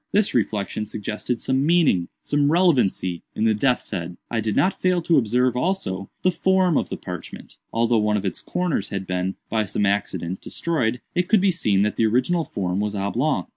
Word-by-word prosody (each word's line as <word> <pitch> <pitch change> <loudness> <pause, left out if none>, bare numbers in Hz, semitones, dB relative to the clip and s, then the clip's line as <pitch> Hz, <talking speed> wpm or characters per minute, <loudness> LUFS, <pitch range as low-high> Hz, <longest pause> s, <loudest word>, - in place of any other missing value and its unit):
This 210 0 +2
reflection 105 -2 -1
suggested 110 +4 -3
some 130 +1 0
meaning—some 145 - +2
relevancy—in 120 - +1
the 110 - +4
death's 125 +4 0
head. 90 -3 -4
I 115 -1 0
did 110 -1 -1
not 190 - +1
fail 185 -1 +3
to 165 -2 +4
observe, 125 +2 +1
also, 125 - -2
the 185 - +4
form 185 0 +2
of - - 0
the - - -4
parchment. 90 -2 -9
Although 115 0 +2
one 105 0 +2
of 100 - -3
its 95 - -3
corners 175 - -2
had 95 -1 -4
been, 90 +1 -2
by 110 -1 0
some 105 +1 -1
accident, 95 -3 -1
destroyed, 125 -8 -1
it 180 0 0
could 215 - +5
be 195 0 +3
seen 105 - +2
that 105 - -1
the 115 - +3
original 160 +10 +1
form 95 -1 -2
was 105 0 -1
oblong. 120 +9 0
115 Hz, 185 wpm, -23 LUFS, 100-165 Hz, -, could